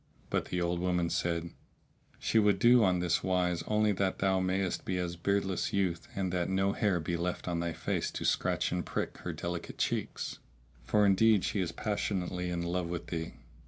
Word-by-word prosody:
But - - +1
the 90 - -2
old 85 0 0
woman 90 -1 0
said, 85 0 -1 0.7
"She 110 - +2
would 105 -2 +4
do 120 +3 +6
on 90 -3 +3
this 90 0 +1
wise 90 -2 +1
only 105 0 +3
that 95 -1 0
thou 95 -1 +2
mayst 95 0 0
be 95 - -2
as 90 -1 -2
a - - -10
beardless 100 +1 0
youth 90 -4 0
and 95 -2 -1
that 90 -1 0
no 95 +1 +2
hair 100 -4 +1
be 85 +2 -2
left 90 +2 -3
on 85 -1 -1
thy 85 -1 -2
face - - -1
to - - -4
scratch - - +1
and - - -1
prick - - -3
her - - -4
delicate 85 0 -5
cheeks; - - -2 0.5
for 105 - +3
indeed 100 +1 +5
she 105 - -1
is 90 -3 -1
passionately 90 -2 -2
in 85 -1 -2
love 85 0 -1
with 85 0 -4
thee. 80 0 -3
90 Hz, 195 wpm, -31 LUFS, 85-100 Hz, 0.7 s, do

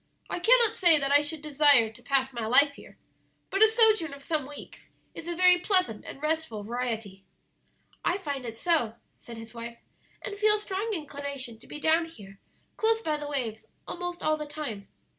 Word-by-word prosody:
I - - -2
cannot 465 +3 +4
say 345 -4 +6
that 275 -1 -1
I 290 +1 +6
should 300 +1 -5
desire 285 -6 +4
to 250 - -18
pass 265 +1 0
my 230 -2 -4
life 280 +5 +5
here, - - -15 0.5
but 390 - -1
a 440 - +9
sojourn 435 -9 +4
of 280 - -14
some 300 -3 -2
weeks 290 0 -12 0.2
is 330 - -9
a 345 - -3
very 360 0 +6
pleasant 365 - +2
and - - -9
restful 305 -9 -2
variety." 225 -4 -4 0.8
"I 360 - +1
find 285 -8 -5
it 230 -2 -7
so," 300 -8 0 0.2
said 235 -1 -12
his 225 0 -11
wife, 235 0 -8 0.5
"and 405 0 -6
feel 425 0 +4
a - - -3
strong 410 +1 -4
inclination 280 -6 -6
to - - -16
be 300 - -9
down 320 +2 +2
here, 195 -11 -14 0.4
close 450 0 +2
by 305 -1 -1
the 295 0 -6
waves, 235 -6 -4 0.2
almost 355 0 -6
all 310 0 +1
the 300 -1 -6
time. 290 -10 -7
295 Hz, 195 wpm, -27 LUFS, 240-350 Hz, 0.8 s, a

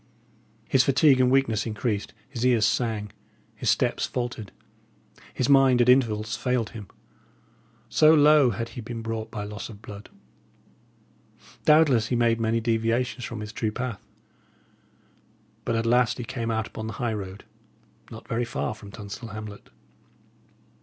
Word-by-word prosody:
His 130 - +4
fatigue 135 0 +4
and 125 - +4
weakness 125 -5 +1
increased; 110 -1 -3
his 125 -3 -5
ears 120 -4 +4
sang, 110 -3 -1 0.4
his - - -2
steps - - +1
faltered, 120 -5 -4 0.8
his 125 - -1
mind 135 -3 +5
at 120 0 +4
intervals 110 -4 +2
failed 125 -1 -1
him, 105 -4 -9 1.0
so 155 +7 +5
low 150 -3 +6
had 115 +1 -4
he 120 +1 -8
been 115 0 -6
brought 115 -1 -4
by 105 - -5
loss 105 +2 -7
of 105 -3 -11
blood. 105 -1 -11 1.6
Doubtless 150 -8 +5
he 125 - -1
made 115 -1 +2
many 115 +1 +1
deviations 115 +2 -1
from 115 -2 -6
his 105 +1 -7
true 110 -2 -2
path, 120 -3 -5 1.6
but 115 - 0
at 115 0 0
last 125 +1 +3
he 125 - -4
came 115 -1 -4
out 110 -1 -1
upon 110 0 -7
the 110 - -5
high 120 -2 -2
road, 100 -1 -7 0.7
not - - -11
very 115 +2 -1
far 120 0 -3
from 105 -2 -12
Tunstall 105 +3 -8
hamlet. 105 -1 -9
115 Hz, 150 wpm, -25 LUFS, 110-125 Hz, 1.6 s, low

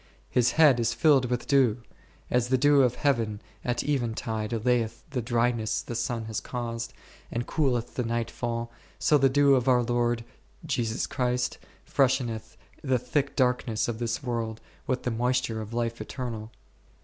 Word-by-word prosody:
My 125 - +6
head 150 -6 +6
is 115 0 +1
filled 135 -2 +4
icith 125 -1 -1
deiv; 130 -6 +3 0.5
as 125 -1 +2
the 130 +1 +3
dew 145 +1 +5
of 125 -2 +3
heaven 115 -8 0 0.2
at 120 -1 -1
even 120 -6 0
tide 110 -2 -3
allayeth 115 0 0
the 130 -3 -1
dryness 115 -1 0
the - - -6
sun 120 -1 -2
has 110 -1 -3
caused, 115 -2 -4 0.4
and 120 +1 -2
cooleth 125 -6 0
the 125 - -1
night 115 0 -2
fall, 115 -1 -3 0.3
so 150 - +3
the 135 0 +5
dew 140 +1 +5
of 130 -1 +2
our 125 -2 +4
Lord, 120 -1 0 0.4
Jesus 115 -1 -1
Christ, 125 0 -1 0.3
fresheneth 125 -5 0 0.2
the 130 -3 +1
thick 135 +3 -1
darkness 125 -4 +1
of 115 -2 -3
this 120 +3 -2
world 115 -3 -3 0.3
with 130 -1 -1
the 125 - -1
moisture 120 -1 0
of 110 0 -8
life 115 0 -2
eternal. 115 -4 -5
120 Hz, 165 wpm, -27 LUFS, 115-130 Hz, 0.5 s, My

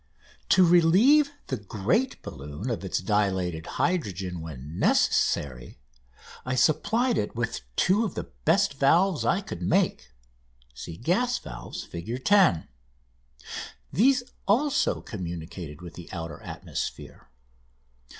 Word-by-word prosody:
To 185 - +6
relieve 190 - +5 0.2
the 130 - -3
great 105 - -1
balloon 75 - -6
of 110 - -3
its 95 - -1
dilated 95 -5 0
hydrogen 95 - -1
when 75 0 -8
necessary 65 -4 +1 0.7
I 130 0 -2
supplied 220 - +2
it 105 - -3
with 115 - -2
two 200 +5 +3
of 220 - -3
the - - -3 0.2
best 140 - +2
valves 170 +5 +3
I 185 +5 +2
could 90 - -7
make 65 -6 +1 0.9
("Gas 245 - +2
Valves," - - -8
Fig. 115 +10 -6
10). 190 - +4 1.3
These 250 - +4 0.2
also 265 +8 +2
communicated 85 -4 -7
with 85 - -9
the 85 - -10
outer 80 -2 -6
atmosphere. - - -6
115 Hz, 110 wpm, -27 LUFS, -, 1.3 s, To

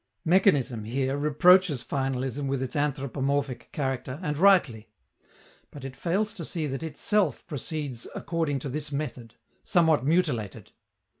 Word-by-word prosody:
Mechanism, 145 - +3
here, 130 +4 -1
reproaches 150 0 +4
finalism 135 0 -2
with 135 -1 -1
its 130 - -5
anthropomorphic 140 -2 -1
character, 130 -2 -3
and 150 -3 -1
rightly. 145 - +3 0.8
But 140 -2 -10
it 135 0 -7
fails 195 +9 -1
to - - -7
see 165 -4 -2
that 135 -1 -4
itself 185 +6 0
proceeds 145 -5 -5
according 165 -4 -1
to 140 - -4
this 150 +2 -4
method 125 -5 -5 0.3
somewhat 160 -6 +3
mutilated! 145 - 0
145 Hz, 130 wpm, -27 LUFS, 130-160 Hz, 0.8 s, reproaches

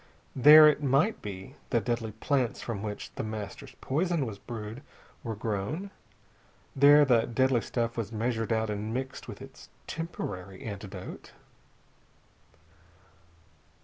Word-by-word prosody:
There, 150 +4 +9
it 150 0 +3
might 140 - +2
be, 100 +6 -8
the 120 - +2
deadly 115 0 -2
plants 125 +2 0
from 110 -4 -4
which 105 -1 -6
The - - -4
Master's 110 -2 -7
poison 165 +1 0
was 105 -4 -7
brewed 110 +2 -7 0.4
were 115 -2 -4
grown. 110 - -3 0.8
There 145 +2 +7
the 120 -4 +3
deadly 130 0 +2
stuff 115 0 -2
was 115 -2 -3
measured 115 0 -2
out 110 -1 0
and 105 +1 -4
mixed 130 +1 -5
with - - -8
its - - -14 0.2
temporary 95 - -6
antidote.... 100 -3 -8
115 Hz, 125 wpm, -29 LUFS, 105-135 Hz, 0.8 s, There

